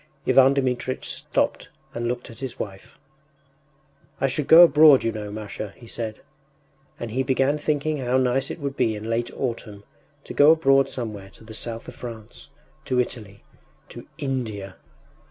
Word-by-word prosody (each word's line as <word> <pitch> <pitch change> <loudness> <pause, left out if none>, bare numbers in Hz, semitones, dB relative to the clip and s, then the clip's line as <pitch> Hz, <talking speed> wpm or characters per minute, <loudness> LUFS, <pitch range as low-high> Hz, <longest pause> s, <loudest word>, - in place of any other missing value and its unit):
Ivan 135 +1 +5
Dmitritch 130 -1 -1
stopped - - -1 0.2
and 120 0 -3
looked 120 0 -4
at 115 - -13
his 130 -3 -6
wife. 95 -2 -8 1.2
“I - - +1
should 135 +1 -1
go 165 +2 +10
abroad, 155 -4 +7
you 115 - 0
know, 105 -1 -6
Masha,” 105 -1 -7
he 120 - -14
said. 115 -1 -6 0.8
And 120 -2 -5
he 130 +4 0
began 135 +3 +1
thinking 150 +1 -1
how 130 -1 0
nice 130 +1 +1
it - - -5
would 140 -2 -4
be 110 -5 +1
in 110 +2 -5
late 120 +1 -1
autumn 115 -5 -4 0.4
to - - -8
go 145 +1 +6
abroad 135 -4 +3
somewhere 105 -7 -6
to - - -17
the 110 0 -11
South 115 +1 -4
of - - -8
France... 115 -3 -10 0.4
to 125 - 0
Italy.... 110 -5 -4 0.5
to - - -11
India! 110 -8 -4
125 Hz, 165 wpm, -24 LUFS, 110-135 Hz, 1.2 s, go